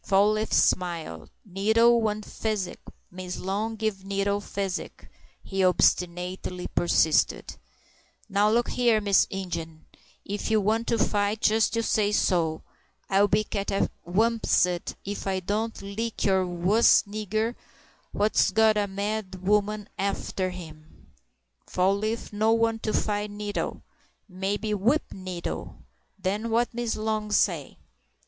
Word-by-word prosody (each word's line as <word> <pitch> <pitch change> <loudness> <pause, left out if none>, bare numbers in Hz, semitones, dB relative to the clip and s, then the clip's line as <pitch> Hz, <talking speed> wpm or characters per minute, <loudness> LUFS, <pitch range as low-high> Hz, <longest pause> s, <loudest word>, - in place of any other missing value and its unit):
Fall 200 +2 +4
leaf 215 +1 -1
smiled. 165 - 0 0.2
"Nettle 220 +5 +3
want 215 -1 -1
physic—Miss 185 -3 -5
Long 210 +4 -2
give 215 -3 -2
Nettle 200 +1 -1
physic," 195 -2 -5 0.4
he 195 -1 -1
obstinately 180 0 +1
persisted. 160 -2 +2 0.7
"Now 205 0 +2
look 235 +2 +2
here, 240 -3 +3
Mr. 200 -2 +3
Ingen, 170 -4 -5 0.4
ef 205 +3 -3
you 220 -1 +3
wants 220 +3 0
to 230 - +2
fight, 205 0 0
jest 220 +1 +3
you 230 - 0
say 210 -2 +1
so, 165 -6 +1 0.5
and 195 - -1
I'll 205 - +5
be 210 +2 +2
catawampussed 200 -2 0
ef 200 0 -5
I 190 -1 0
don't 215 +4 -2
lick 215 +3 -4
you 190 -2 +2
wuss'n 195 +4 +3
a 215 -1 -4
nigger 220 +3 0 0.6
what's 210 +1 +2
got 220 +2 +4
a 205 -1 +1
mad 200 -1 -4
woman 210 0 +1
arter 195 -1 -1
him!" 155 - -12 0.6
"Fall 185 +2 +2
leaf 215 +2 -3
no 215 +2 +2
want 225 0 +1
to 215 - -2
fight 210 0 -1
Nettle. 205 0 -4 0.4
Maybe 200 +3 -2
whip 235 +10 +2
Nettle—den 190 +3 -6
what 235 +2 +1
Miss 240 -1 -2
Long 215 -1 -2
say?" 170 -7 +1
205 Hz, 125 wpm, -26 LUFS, 185-215 Hz, 0.7 s, I'll